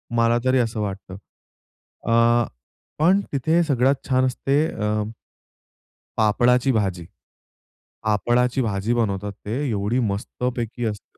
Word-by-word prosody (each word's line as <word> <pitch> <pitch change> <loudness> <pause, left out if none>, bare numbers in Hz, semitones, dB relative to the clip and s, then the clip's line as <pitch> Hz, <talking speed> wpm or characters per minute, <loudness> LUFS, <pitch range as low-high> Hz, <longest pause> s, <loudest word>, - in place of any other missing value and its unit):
मला 115 0 +3
तरी 130 0 +3
असं 115 -2 -1
वाटतं. 95 -2 -5 0.9
अ, 115 0 +4 0.5
पण 185 +5 +4
तिथे 160 +6 +2
सगळ्यात 135 -2 +2
छान 130 0 +3
असते 140 +4 +1
अ, 105 0 -1 1.2
पापडाची 125 +4 +3
भाजी. 95 -6 -1 1.0
पापडाची 120 +5 +1
भाजी 105 +1 -1
बनवतात 105 -3 -1
ते 110 +4 -2
एवढी 105 +4 0
मस्तपैकी 120 +3 -3
असते. 105 - -12
115 Hz, 105 wpm, -23 LUFS, 105-125 Hz, 1.2 s, अ